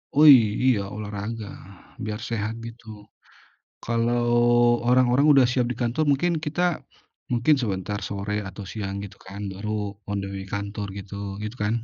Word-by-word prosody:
Oh 150 +2 +7
iy 130 -5 +10 0.3
iya 105 -6 +2
olahraga 105 +1 -5 0.5
biar 105 -1 -3
sehat 110 -1 -2
gitu. 115 0 -12 1.0
Kalau 120 +1 +1 0.6
orang-orang 125 +2 +4
udah 135 -2 +6
siap 125 -2 +1
di 125 - -3
kantor 120 +6 +1
mungkin 170 +6 +2
kita, 160 +3 -1 0.7
mungkin 120 +5 +3
sebentar 100 -1 -2
sore 100 +1 -3
atau 95 +2 -8
siang 100 -3 -4
gitu 100 0 -10
kan 100 +2 -8
baru 105 +3 -4 0.4
on 100 0 -1
the - - -5
way 95 - -5
kantor 100 0 -4
gitu, 100 0 -6
gitu 105 +4 -6
kan? 105 +2 +1
110 Hz, 150 wpm, -25 LUFS, 100-120 Hz, 1.0 s, iy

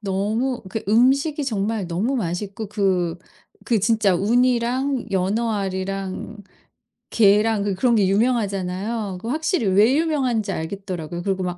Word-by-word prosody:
너무 215 +6 -1
그러니까 205 +1 -3
음식이 275 +6 +3
정말 215 -4 -2
너무 200 +11 -1
맛있고 200 +1 -3
그 185 -5 0 0.5
그 230 -3 +1
진짜 210 -2 +2
우니랑 245 +5 +1
연어알이랑 195 0 -2 0.8
게랑 210 0 +3
그 200 -1 -1
그런 235 +4 +2
게 205 -4 +3
유명하잖아요. 200 -2 -1
그 225 - -5
확실히 315 - 0
왜 205 +7 +4
유명한지 265 -10 0
알겠더라고요. 175 -1 -5
그리고 190 0 -1
막 180 -1 -3
210 Hz, 305 characters per minute, -22 LUFS, 190-235 Hz, 0.8 s, 왜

